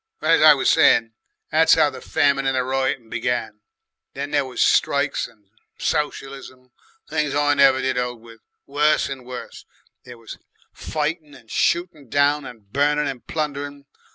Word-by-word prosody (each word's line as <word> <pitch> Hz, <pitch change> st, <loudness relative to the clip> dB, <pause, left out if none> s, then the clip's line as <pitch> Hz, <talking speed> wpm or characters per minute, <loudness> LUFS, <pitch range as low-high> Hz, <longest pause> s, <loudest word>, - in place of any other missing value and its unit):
Well, -, -, 0 dB
as 165 Hz, -, +4 dB
I 155 Hz, -1 st, +8 dB
was 135 Hz, -, +2 dB
saying, 115 Hz, -1 st, +4 dB, 0.4 s
that's -, -, +5 dB
how -, -, +3 dB
the -, -, -10 dB
Famine 140 Hz, -1 st, +1 dB
and 135 Hz, -1 st, 0 dB
Riotin' 130 Hz, -2 st, -1 dB
began. 115 Hz, -2 st, -3 dB, 0.6 s
Then 140 Hz, +1 st, -5 dB
there 145 Hz, -2 st, +1 dB
was 125 Hz, -2 st, -9 dB
strikes 140 Hz, 0 st, +1 dB
and 105 Hz, -2 st, -24 dB, 0.3 s
Socialism, 135 Hz, -4 st, -4 dB, 0.4 s
things 150 Hz, -2 st, -1 dB
I 145 Hz, 0 st, +2 dB
never 135 Hz, -2 st, +4 dB
did 130 Hz, -1 st, 0 dB
'old 125 Hz, -1 st, -3 dB
with, 115 Hz, 0 st, -16 dB, 0.3 s
worse 150 Hz, +2 st, +1 dB
and 135 Hz, -2 st, -7 dB
worse. 125 Hz, -1 st, -9 dB, 0.4 s
There 125 Hz, -1 st, -12 dB
was 115 Hz, -1 st, -11 dB, 0.3 s
fightin' 155 Hz, -1 st, -4 dB
and 115 Hz, -, -17 dB
shootin' 170 Hz, -6 st, -1 dB
down, 145 Hz, +1 st, +2 dB
and 110 Hz, -6 st, -12 dB
burnin' 150 Hz, +2 st, +1 dB
and 130 Hz, -4 st, -6 dB
plundering. 145 Hz, -2 st, -4 dB
140 Hz, 155 wpm, -22 LUFS, 125-145 Hz, 0.6 s, I